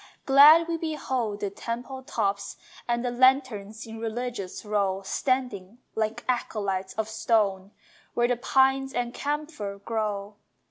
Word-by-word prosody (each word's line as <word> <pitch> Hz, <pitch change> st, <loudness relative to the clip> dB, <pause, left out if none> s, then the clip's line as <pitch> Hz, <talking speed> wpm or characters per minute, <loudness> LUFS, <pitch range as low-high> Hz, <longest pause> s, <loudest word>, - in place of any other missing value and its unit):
Glad 300 Hz, +5 st, +8 dB
we 335 Hz, -1 st, -1 dB
behold 260 Hz, -10 st, -2 dB
the 200 Hz, -, -2 dB
temple 245 Hz, +5 st, -5 dB
tops 200 Hz, -5 st, -2 dB, 0.3 s
And 240 Hz, +1 st, 0 dB
the 245 Hz, -, 0 dB
lanterns 240 Hz, -4 st, +2 dB
in 225 Hz, 0 st, -8 dB
religious 230 Hz, -4 st, -4 dB
row 200 Hz, -2 st, 0 dB
Standing, 235 Hz, -3 st, -2 dB, 0.2 s
like 220 Hz, +2 st, -2 dB
acolytes 200 Hz, -6 st, -1 dB
of 220 Hz, -1 st, -1 dB
stone, 210 Hz, -4 st, +1 dB, 0.5 s
Where 240 Hz, 0 st, +3 dB
the 245 Hz, -, +1 dB
pine 265 Hz, +2 st, +2 dB
and 245 Hz, 0 st, -1 dB
camphor 290 Hz, -10 st, -3 dB
grow. 205 Hz, -1 st, -3 dB
230 Hz, 130 wpm, -27 LUFS, 205-260 Hz, 0.5 s, Glad